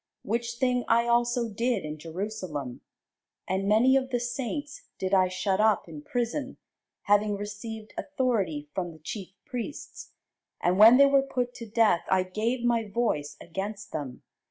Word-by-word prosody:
Which 235 +2 -2
thing 250 0 +1
I 235 +1 +4
also 240 0 +2
did 225 -2 -1
in 155 0 -6
Jerusalem: 165 - -5 0.7
and 190 +2 0
many 240 +5 +5
of 265 -1 +1
the 245 -2 0
saints 270 +4 -4 0.2
did 190 +1 -2
I 185 -1 +5
shut 190 +1 -1
up 215 -3 +3
in 155 -3 -9
prison, 245 - -3 0.5
having 205 0 +3
received 210 +1 -7
authority 215 - -1
from 175 -3 -3
the - - -14
chief 190 +4 -7
priests; 250 +3 -7 0.5
and 180 +2 +1
when 225 +4 +9
they 280 - +8
were 275 0 +5
put 250 -2 -2
to 230 - -8
death, 215 -6 +3
I 190 -1 +3
gave 220 +7 -2
my 235 -1 +2
voice 150 -10 -1
against 195 +4 -6
them. 140 -5 -6
215 Hz, 155 wpm, -28 LUFS, 185-240 Hz, 0.7 s, when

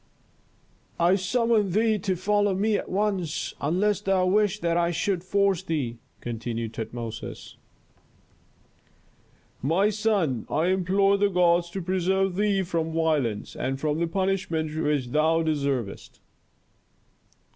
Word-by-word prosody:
"I 170 +2 +4
summon 210 +2 +1
thee 215 0 +2
to 190 0 -1
follow 205 +2 +1
me 210 +3 +1
at - - -3
once, 190 -5 -1
unless 190 +7 +1
thou 195 -2 +2
wish 205 +2 +2
that 170 -1 +1
I 170 0 +2
should 175 +1 -1
force 195 -1 +1
thee," 145 -10 -3 0.2
continued 115 -1 -4
Tutmosis. 115 0 -6 2.1
"My 180 - +2
son, 200 - 0
I 160 +4 +1
implore 195 +2 +2
the 205 0 +3
gods 175 -2 +3
to 190 +1 -5
preserve 190 +1 0
thee 200 -1 +1
from 165 -3 -2
violence, 150 -10 0
and 135 +1 -2
from 150 +1 -1
the 170 - +1
punishment 170 -4 -1
which 150 -5 0
thou 160 +4 +2
deservest." 140 -9 -2
180 Hz, 125 wpm, -26 LUFS, 155-195 Hz, 2.1 s, I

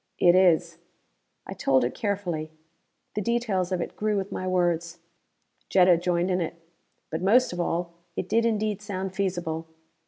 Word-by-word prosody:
"It 175 - +5
is." 180 -3 +3 0.7
I - - -6
told 130 -2 +2
it 120 - -1
carefully. 180 -7 -2 0.6
The 210 - -2
details 210 -5 0
of 180 -2 0
it - - -5
grew 215 -1 0
with 195 0 -3
my 185 - -3
words. 175 -2 0 0.7
Jetta 180 -2 +5
joined 175 +1 0
in 180 0 +1
it. 165 - -3 0.6
But, 160 +1 -2
most 225 +4 +4
of 175 - -5
all, 170 0 -1 0.2
it 185 - -3
did 230 +3 +2
indeed 215 -2 0
sound 190 -3 -4
feasible. 175 -4 -2
185 Hz, 160 wpm, -26 LUFS, 170-200 Hz, 0.7 s, It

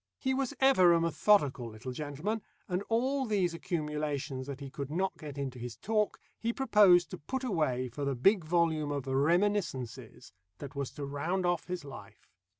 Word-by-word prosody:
He 265 -1 0
was 265 -1 -1
ever 225 -11 +6
a 170 - +4
methodical 160 - +2
little 110 +4 -7
gentleman, 150 - -3 0.3
and 180 0 -1
all 260 +4 +1
these 190 -5 +1
accumulations 150 -6 -3
that 140 -1 -6
he 140 -2 -8
could 140 0 -5
not 185 +5 -1
get 145 -3 -9
into 135 -3 -4
his 120 -1 -6
talk, 215 0 0 0.2
he 230 - 0
proposed 210 -9 +5
to 185 - -6
put 265 - -4
away 155 - 0
for 125 +4 -6
the 140 -1 0
big 190 - +4
volume 160 -2 +1
of 140 -2 -3
"Reminiscences" 135 - 0 0.2
that 140 +5 -8
was 140 -2 -3
to 145 - -5
round 165 +7 -2
off 175 -2 0
his 180 -4 -4
life. 140 - -11
155 Hz, 175 wpm, -31 LUFS, 140-195 Hz, 0.3 s, ever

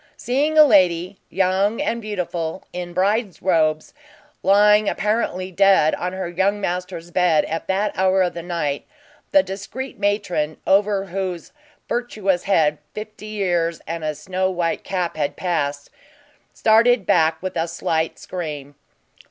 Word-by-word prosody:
Seeing 290 +5 0
a 305 - +10
lady, 185 - +3
young 195 +3 +1
and 235 +1 -1
beautiful, 180 -5 -4
in 180 -1 -5
bride 200 +2 0
robes, 155 -4 +1 0.5
lying 210 +2 +5
apparently 205 -3 -1
dead 190 -4 +4
on 180 - -2
her 190 -1 -4
young 190 +4 0
master's 180 -2 -4
bed 175 -4 +3
at 165 +1 -4
that 195 +2 0
hour 190 0 +3
of 180 - -1
the 170 - -6
night, 165 -5 -3 0.4
the 290 -1 +5
discreet 205 +7 -7
matron, 200 -7 -1
over 195 0 +2
whose 185 -2 -4 0.4
virtuous 205 -7 -1
head 155 -6 +2 0.2
fifty 215 0 -8
years 175 -6 -1
and 165 0 -5
a 155 -1 -2
snow 185 +3 -2
white 175 -3 -2
cap 180 -4 -2
had 145 -2 -1
passed, 145 -5 -2 0.6
started 225 0 +3
back 160 -2 +3
with 185 - -4
a 165 0 0
slight 165 -1 -2
scream. 150 -6 -6
185 Hz, 140 wpm, -21 LUFS, 170-205 Hz, 0.6 s, a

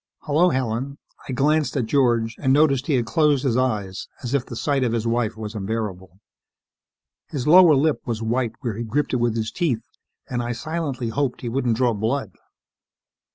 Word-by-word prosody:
"Hello, 160 +5 +3
Helen." 130 0 -2 0.3
I - - -1
glanced 145 +1 +1
at 125 - 0
George 120 -2 +1
and 130 -3 +1
noticed 140 -2 +3
he 150 - +2
had 120 -2 +1
closed 150 +1 +2
his 130 -5 +1
eyes 105 -7 -1 0.2
as 120 +1 -3
if 140 -3 +2
the 120 - -9
sight 140 +2 0
of 120 -2 0
his 115 -1 -1
wife 115 -1 0
was 110 -1 -6
unbearable. 100 -4 -4 1.1
His 135 -4 -4
lower 170 -1 +7
lip 150 +2 +1
was 115 -2 -2
white 115 +1 -1
where 120 -5 -2
he 115 - -4
gripped 140 +7 -1
it - - +3
with 120 -2 0
his 110 -1 -2
teeth 130 -11 -1 0.4
and 125 -1 -2
I 120 0 -2
silently 140 -2 -3
hoped 125 +2 -2
he 120 - -3
wouldn't 120 -2 0
draw 125 -2 +2
blood. 110 +1 -2
125 Hz, 190 wpm, -23 LUFS, 115-140 Hz, 1.1 s, lower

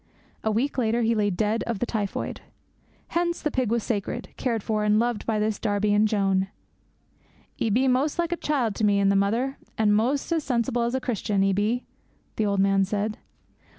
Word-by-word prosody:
A 220 - +1
week 250 +6 0
later 235 0 +1
he 225 +1 +3
lay 210 -2 +1
dead 210 +4 0
of 235 -3 -1
the 245 - -1
typhoid. 210 -4 -3 0.7
Hence 345 0 0
the 300 - -1
pig 255 -5 0
was 230 -1 0
sacred, 230 +2 -3
cared 230 -5 -1
for, 215 -2 0
and 210 0 +3
loved 235 -1 0
by 220 -2 +1
this 215 0 0
Darby 205 -1 +1
and 210 +1 +4
Joan. 195 -2 +1 1.1
'"'E 225 - +1
be 250 +6 +2
mos' 265 +5 +1
like 345 0 0
a - - +2
child 270 -10 0
to - - -2
me 205 -1 +4
and 200 0 +3
the - - +2
mother, 230 +8 0 0.2
an' 215 -1 +3
mos' 255 +9 +1
as 325 -2 +1
sensible 240 -3 0
as 235 +2 0
a - - +1
Christian, 210 -5 0
'e 195 0 +2
be," 215 +5 0 0.5
the 215 - +1
old 200 -1 0
man 195 0 +3
said.' 210 +3 -2
220 Hz, 205 wpm, -25 LUFS, 205-245 Hz, 1.1 s, and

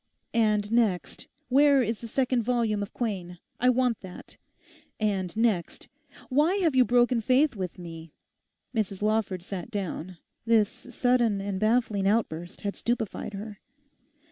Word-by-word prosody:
And 210 -2 +2
next—where 245 - +2
is 225 -1 -3
the 235 - -6
second 255 +1 +1
volume 225 -3 0
of 200 - -5
Quain? 185 -7 -4 0.2
I 250 - +4
want 250 -2 +2
that. 185 -2 -11 0.6
And 200 -3 -1
next—why 275 - -1
have 340 -8 +1
you 255 - +7
broken 245 0 +3
faith 260 +4 +3
with 185 -3 -5
me?' 165 -2 -9 0.6
Mrs 205 -4 -2
Lawford 210 -4 0
sat 185 -1 -6
down. 185 -4 -4 0.3
This 225 -3 +3
sudden 245 -4 0
and 195 -1 -3
baffling 215 -3 +1
outburst 175 -5 -1
had 200 -1 -3
stupefied 225 -3 -3
her. 205 0 -7
220 Hz, 130 wpm, -27 LUFS, 195-245 Hz, 0.6 s, you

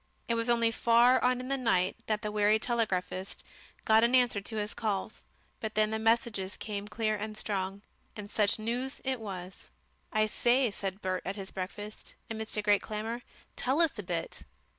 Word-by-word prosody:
It 235 - +1
was 230 +1 0
only 230 -1 +4
far 235 +3 +5
on 250 0 +3
in 255 - -6
the 275 0 -1
night 185 -7 +2
that 215 0 0
the 210 - -2
weary 210 +1 +4
telegraphist 200 -5 -1 0.4
got 220 +1 +6
an 240 +2 +4
answer 245 -5 +4
to 220 +3 -6
his 210 -1 -2
calls, 215 -2 -2 0.4
but 220 -1 -4
then 215 0 +3
the 220 - -1
messages 220 -3 +1
came 205 -1 -4
clear 215 0 0
and 215 +1 -5
strong. 195 -1 -3 0.3
And 210 -1 -7
such 210 -1 +3
news 245 +5 -2
it 260 -2 0
was! 190 -3 -7 0.4
"I 215 -1 +3
say," 240 +2 +2
said 195 0 -5
Bert 185 -1 -1
at 195 - -3
his 195 -2 -7
breakfast, 205 +3 -6 0.2
amidst 220 -1 -3
a 210 - 0
great 205 -1 +4
clamour, 220 +3 -3 0.3
"tell 265 +5 +1
us 330 -3 +5
a - - -1
bit." 175 -3 -3
215 Hz, 185 wpm, -30 LUFS, 200-235 Hz, 0.4 s, got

